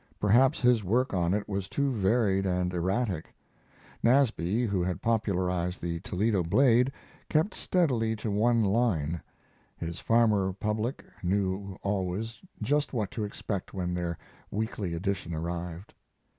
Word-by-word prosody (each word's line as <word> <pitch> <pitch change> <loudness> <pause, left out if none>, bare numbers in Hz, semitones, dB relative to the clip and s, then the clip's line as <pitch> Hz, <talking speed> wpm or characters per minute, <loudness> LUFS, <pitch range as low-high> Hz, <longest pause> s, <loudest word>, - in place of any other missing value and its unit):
Perhaps 125 +8 +4
his 120 -3 +4
work 120 +7 +1
on 85 -2 +1
it 105 +1 0
was 100 -2 -3
too 140 -1 0
varied 100 -3 +2
and 90 -1 0
erratic. 95 0 -1 0.7
Nasby, 120 -4 +3
who 100 -4 0
had 90 -2 -1
popularized 90 -5 0
the 85 -1 -3
Toledo 100 +2 0
Blade, 125 +8 +4 0.4
kept 160 +6 +2
steadily 125 -11 +1
to 110 0 -3
one 115 +3 +3
line. 95 -7 +1 0.6
His 85 +1 -5
farmer 105 -5 +3
public 105 +5 -2 0.2
knew 95 +1 -1
always 100 +3 -2 0.2
just 145 0 +1
what 110 -5 -1
to 110 - -3
expect 100 -2 -4
when 90 -2 -2
their 85 -2 -2 0.3
weekly 100 -4 -2
edition 90 -2 -2
arrived. 85 +3 -5
100 Hz, 130 wpm, -29 LUFS, 90-115 Hz, 0.7 s, Perhaps